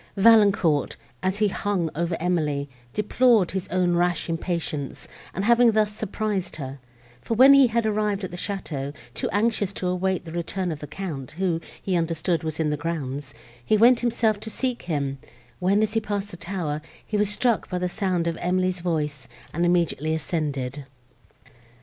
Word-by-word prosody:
Valancourt, 200 -8 +5 0.3
as 185 +1 0
he 210 0 +3
hung 195 -3 -1
over 170 +1 -1
Emily, 155 -5 0 0.2
deplored 210 - +3
his 190 -1 -3
own 180 -1 +1
rash 175 -1 +1
impatience, 165 -4 -3 0.3
in 190 - -1
having 235 +1 +5
thus 210 -1 +2
surprised 210 -2 -2
her: 135 -2 -6 0.4
for 230 - -2
when 265 +4 +8
he 275 -2 +7
had 230 0 0
arrived 210 -2 0
at 185 - -4
the - - -6
château, 155 -7 -4 0.2
too - - -2
anxious 205 -1 +1
to 195 - -5
await 180 0 0
the 165 - -8
return 175 +2 -2
of 155 - -5
the 150 - -7
Count, 155 -9 -6
who, 170 -1 0 0.2
he 190 - -1
understood, 165 0 0
was 160 0 -3
in 155 -2 +1
the 150 - -1
grounds, 145 -4 -4 0.3
he 215 - +3
went 235 +3 +6
himself 230 -3 +1
to 220 - -6
seek 250 +2 -2
him, 140 -5 -2 0.4
when, 195 +3 +3
as 215 0 -1
he 225 - +3
passed 205 -1 -3
the 175 - -8
tower, 170 -5 -3 0.2
he 215 - -4
was 210 -1 +2
struck 230 +1 +1
by 180 - -2
the 180 0 0
sound 180 -3 -1
of 170 -1 0
Emily's 185 0 0
voice, 150 -6 -2 0.3
and 170 +2 +1
immediately 160 -3 +1
ascended. 145 -4 -3
180 Hz, 175 wpm, -25 LUFS, 160-210 Hz, 0.4 s, when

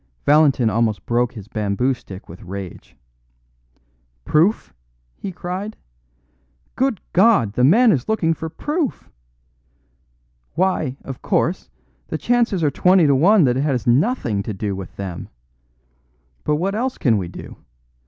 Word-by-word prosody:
Valentin 145 -5 +4
almost 110 -4 0
broke 120 +1 0
his 105 -5 -10
bamboo 110 +3 0
stick 95 -6 -11
with 85 - -12
rage. 95 -1 -9 1.3
"Proof!" 160 - +1 0.4
he 195 - -6
cried. 185 +4 -6 1.0
"Good 265 -6 0
God! 185 - +4
the 125 - +1
man 220 - +6
is 130 - -1
looking 170 -7 +1
for 160 0 -6
proof! 295 - -3 1.4
Why, 165 -7 0
of 135 -2 -8
course, 175 +4 -1 0.4
the - - -3
chances 235 -7 +1
are 145 - +2
twenty 180 +3 +4
to 140 - +4
one 180 +8 +5
that 125 -2 +2
it - - +1
has 135 -6 -1
nothing 120 - +1
to 105 0 -5
do 100 0 -3
with 95 -2 -8
them. 95 -3 -6 1.1
But 150 - +1
what 185 +6 -1
else 250 +4 -2
can 115 -6 +2
we 90 - -4
do? 85 - -10
140 Hz, 140 wpm, -20 LUFS, -, 1.4 s, man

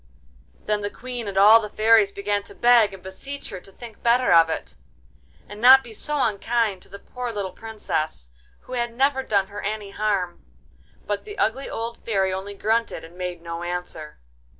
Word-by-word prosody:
Then 210 0 0
the 205 - -2
Queen 245 0 -7
and 195 -1 -4
all 210 +3 +8
the 210 - -6
fairies 215 -2 +4
began 205 +1 -1
to - - -9
beg 235 -3 +5
and 190 -2 -12
beseech 270 +10 -7
her - - -6
to 195 - -15
think 230 +2 -12
better 240 -2 +3
of 165 -1 +6
it, 115 - -5 0.7
and 205 +1 -10
not 265 +2 +9
be 230 - -11
so 295 +6 -2
unkind 215 -1 0
to - - -13
the 200 - -9
poor 250 +3 -6
little 200 -4 -4
Princess, 155 - -4 0.3
who - - -11
had 240 -1 -2
never 270 +1 +2
done 200 -6 +1
her 205 +1 -7
any 210 -1 -4
harm. 195 -4 -2 0.6
But 205 -1 -3
the 415 -1 -9
ugly 270 - 0
old 230 +1 -5
Fairy 195 -4 0
only 195 +2 -5
grunted 225 +3 -1
and 165 +2 -13
made 180 -2 -5
no 170 0 -5
answer. 175 -3 -5
210 Hz, 190 wpm, -23 LUFS, 190-235 Hz, 0.7 s, not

